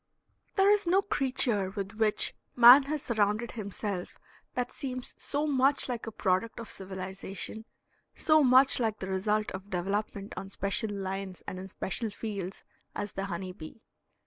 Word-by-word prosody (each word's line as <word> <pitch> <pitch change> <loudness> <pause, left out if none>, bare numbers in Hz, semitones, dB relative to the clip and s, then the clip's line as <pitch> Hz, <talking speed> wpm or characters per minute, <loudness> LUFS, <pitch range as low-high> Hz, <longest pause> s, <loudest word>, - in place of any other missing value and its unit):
There 395 +1 +5
is 415 -3 +2
no 380 +3 +4
creature 250 - +1
with 195 0 -5
which 215 -1 +2 0.2
man 245 +3 +9
has 305 -2 -2
surrounded 215 0 0
himself 200 -3 -5 0.4
that 250 -1 -1
seems 255 -2 -5
so 290 +1 -1
much 275 -1 +3
like 240 -3 -4
a - - -4
product 195 +3 0
of 230 - -7
civilization, 190 +2 -6 0.5
so 310 -1 +4
much 260 +1 +6
like 220 -3 0
the 190 - -5
result 210 +3 0
of 190 +2 -8
development 200 +2 -3
on 195 +1 -6
special 200 +3 0
lines 195 -2 -5
and 185 - -6
in 190 - -7
special 205 +4 0
fields, 200 -3 -5 0.3
as 205 0 -3
the 195 - -4
honey 185 0 -4
bee. 180 +4 -11
210 Hz, 155 wpm, -29 LUFS, 195-250 Hz, 0.5 s, man